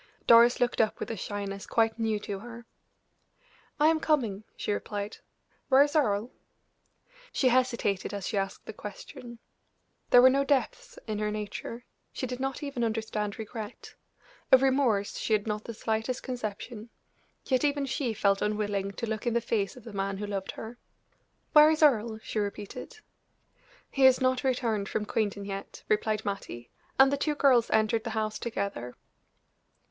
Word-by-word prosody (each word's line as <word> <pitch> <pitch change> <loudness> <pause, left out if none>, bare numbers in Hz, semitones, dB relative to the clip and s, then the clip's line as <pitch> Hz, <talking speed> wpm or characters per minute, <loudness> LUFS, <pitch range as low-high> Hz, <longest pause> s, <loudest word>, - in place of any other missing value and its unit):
Doris 235 +1 +7
looked 245 -1 +2
up 220 - 0
with - - -4
a - - -3
shyness 200 0 -5
quite 225 0 +1
new 220 -2 0
to 200 -2 -5
her. 235 +2 -10 1.1
"I 300 - +4
am 325 -1 +2
coming," 235 -11 0
she - - -2
replied. 205 0 -4 0.5
"Where 270 +1 +7
is 290 +1 -3
Earle?" 225 -5 +1 1.0
She 260 - +2
hesitated 235 -6 +1
as 200 -2 -5
she 225 - -3
asked 195 0 -3
the - - -7
question. 235 +3 -9 0.7
There 245 - +7
were 260 - +9
no 275 +1 +2
depths 480 - -1
in 215 -2 -3
her 210 0 0
nature; 215 +3 -5 0.3
she - - -4
did 250 0 -5
not 270 +2 -3
even 275 -4 -3
understand 220 -2 -2
regret 220 -1 -8 0.6
of 260 0 +7
remorse 255 -7 +2
she 220 - 0
had 210 -1 +2
not 210 -1 -3
the 230 - -6
slightest 225 +4 -2
conception; 230 -2 -5 0.6
yet 260 0 +1
even 285 -1 +1
she 260 -2 -1
felt 195 -1 +2
unwilling 205 -2 -1
to 235 - -4
look 220 +1 -4
in 235 - +1
the - - +4
face 225 -2 -2
of 250 - -12
the 225 -2 -10
man 195 0 -2
who 210 - -4
loved 200 -2 -4
her. 230 +2 -9 0.7
"Where 300 0 +9
is 315 0 +2
Earle?" 230 -6 +3
she 220 - -3
repeated. 205 - -5 0.9
"He 270 -1 +3
has 260 -1 +7
not 255 0 +1
returned 230 -6 0
from 210 - -2
Quainton 205 -2 -1
yet," 195 0 -7
replied 215 0 0
Mattie; 160 - -5 0.3
and 270 +1 +7
the - - +1
two 300 +1 0
girls 260 -5 +4
entered 220 +1 +2
the - - -4
house 215 0 -1
together. 200 - -4
225 Hz, 170 wpm, -29 LUFS, 205-255 Hz, 1.1 s, were